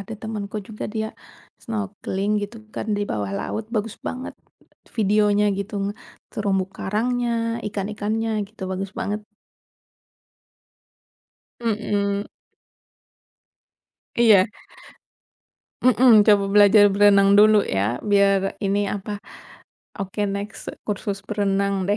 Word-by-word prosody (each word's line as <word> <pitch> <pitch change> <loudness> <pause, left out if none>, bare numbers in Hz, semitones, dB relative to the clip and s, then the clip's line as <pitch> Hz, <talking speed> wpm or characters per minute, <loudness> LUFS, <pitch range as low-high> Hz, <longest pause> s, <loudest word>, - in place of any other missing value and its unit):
ada 205 +3 -7
temanku 215 -2 -5
juga 215 -1 -6
dia 220 -1 -1 0.6
snorkeling, 205 -2 -3
gitu 205 +3 -6 0.2
kan, - - -4
di - - 0
bawah 105 -2 -2
laut. 220 - -4
Bagus 215 0 -1
banget, 255 +1 -5 0.6
videonya, 210 -1 +3
gitu. 200 +1 -5
Nge 205 - -2 0.4
terumbu 195 -3 0
karangnya, 240 +4 -1 0.4
ikan-ikannya, 210 +2 -2 0.2
gitu, 215 -2 -13
bagus 190 +1 -3
banget. 210 +1 -2 2.4
Mhm. 205 -2 -1 1.9
Iya. 215 -5 +6 1.4
Mhm, 245 -2 +6
coba 205 -1 +4
belajar 205 0 +6
berenang 200 0 +5
dulu, 210 0 +6
ya? 100 +5 0
Biar 200 -1 +3
ini, 200 0 +1
apa 205 +1 -4 0.8
oke, 195 +1 -5
next, 200 +1 -5 0.2
kursus 200 -1 -4
berenang, 200 -2 0
deh. 205 - +2
205 Hz, 100 wpm, -23 LUFS, 200-215 Hz, 2.4 s, Iya